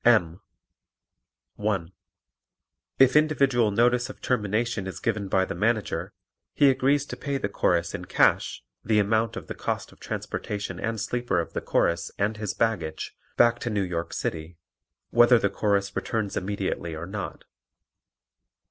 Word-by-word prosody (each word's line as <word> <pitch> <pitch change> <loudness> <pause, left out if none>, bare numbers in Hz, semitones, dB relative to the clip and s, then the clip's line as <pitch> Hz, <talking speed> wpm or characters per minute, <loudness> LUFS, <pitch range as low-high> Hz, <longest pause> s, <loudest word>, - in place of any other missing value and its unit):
M. 95 -7 +3 1.2
(1) 100 -5 -1 1.1
If 135 +1 +5
individual 140 -7 +3
notice 120 +3 +2
of - - -10
termination 110 -2 -1
is 95 - -6
given 105 -3 -1
by 95 0 +2
the - - -4
Manager, 110 +4 0 0.4
he 140 -2 +6
agrees 135 +2 +2
to - - -6
pay 140 -1 -2
the 130 - -1
Chorus 85 -4 +1
in - - -5
cash - - +2 0.2
the 110 0 +2
amount 110 +2 +2
of - - -6
the - - -5
cost - - -3
of - - -19
transportation 100 -3 -4
and 115 +1 -2
sleeper 120 -3 -1
of 85 - -4
the - - -2
Chorus 85 0 +1
and 105 +2 0
his 105 -2 -3
baggage 85 -9 -1 0.2
back 120 0 +5
to 120 - -3
New 105 -3 0
York 85 -2 -3
City, 80 +2 -4 0.5
whether 120 +1 +6
the 100 -3 +1
Chorus 100 -1 0
returns 110 -3 -2
immediately 95 -4 -2
or 80 +2 -5
not. 100 +2 -6
105 Hz, 150 wpm, -26 LUFS, 95-120 Hz, 1.2 s, he